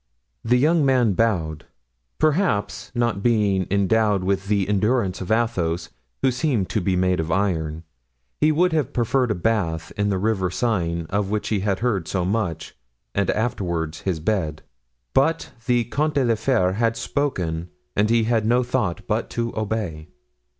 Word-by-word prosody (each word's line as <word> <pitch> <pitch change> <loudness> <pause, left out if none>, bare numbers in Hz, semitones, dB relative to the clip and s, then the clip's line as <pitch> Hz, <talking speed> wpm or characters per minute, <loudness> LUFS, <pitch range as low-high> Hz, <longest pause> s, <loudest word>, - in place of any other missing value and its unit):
The 125 +2 +3
young 155 +4 +3
man 125 -6 +3
bowed. 85 -8 0 0.5
Perhaps, 155 - 0
not 120 -4 0
being 100 -5 +2
endowed 100 0 +2
with 100 +1 -1
the 100 -2 +1
endurance 105 -1 +1
of 95 - -6
Athos, 100 -8 0 0.3
who 130 - +4
seemed 125 - 0
to 105 - 0
be 95 +1 +1
made 90 -1 +1
of 80 0 -2
iron, 80 -4 -1 0.6
he 155 - +4
would 175 +3 +2
have 155 -6 0
preferred 125 +1 +1
a 105 - +1
bath 90 -4 -1
in 105 -1 0
the 100 - +1
river 95 -2 0
Seine 85 -5 -1
of 100 -1 0
which 105 0 -2
he 105 - +1
had 100 0 -1
heard 100 -9 0
so 90 -2 -1
much, 95 -5 -2 0.4
and 100 - 0
afterward 85 -8 -1
his 90 -1 -2
bed; 80 -4 -1 0.5
but 160 +5 +2 0.2
the 120 -1 +3
Comte 150 +6 -1
de 135 -3 +3
la 115 - +3
Fere 110 -5 +1
had 115 +2 0
spoken 90 - -2 0.3
and 105 +2 +2
he 115 0 +3
had 115 -1 +1
no 125 +2 +3
thought 105 -8 -1
but - - -1
to 115 0 -3
obey. 100 -8 -3
105 Hz, 165 wpm, -23 LUFS, 90-120 Hz, 0.6 s, who